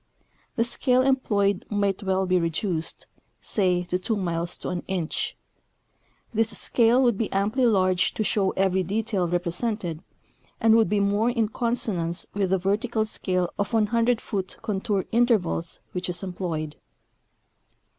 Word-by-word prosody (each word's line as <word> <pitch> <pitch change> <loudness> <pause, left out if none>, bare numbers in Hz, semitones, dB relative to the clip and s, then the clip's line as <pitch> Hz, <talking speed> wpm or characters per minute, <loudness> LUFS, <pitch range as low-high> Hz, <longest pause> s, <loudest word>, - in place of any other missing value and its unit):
The 230 - +2
scale 250 +2 +2
employed 205 -7 +1
might 200 -1 0
well 190 -1 0
be 185 0 +2
reduced, 165 0 -2 0.3
say, 180 -4 0
to 180 +1 -2
2 220 +4 -1
miles 170 -3 -2
to - - -5
an 180 -1 -2
inch. 180 -4 -2 1.0
This 225 +1 0
scale 240 +2 +3
would 240 -5 +2
be 225 - -1
amply 215 +6 +2
large 185 -4 +2
to 215 - 0
show 200 -2 +1
every 190 -1 +2
detail 200 -1 -1
represented, 175 0 -2 0.6
and 225 -1 +5
would 225 -1 +4
be 210 - +2
more 205 +3 +2
in 230 -3 0
consonance 215 -8 -1
with 195 -2 0
the 190 - +3
vertical 215 +4 0
scale 185 -4 -1
of 200 +3 -1
100 230 +2 +2
foot 190 -3 -4
contour 200 -1 -1
intervals 220 -8 +1
which 180 0 -3
is 175 +2 -3
em 185 -2 -4
ployed. 160 -5 -3
200 Hz, 145 wpm, -25 LUFS, 180-225 Hz, 1.0 s, and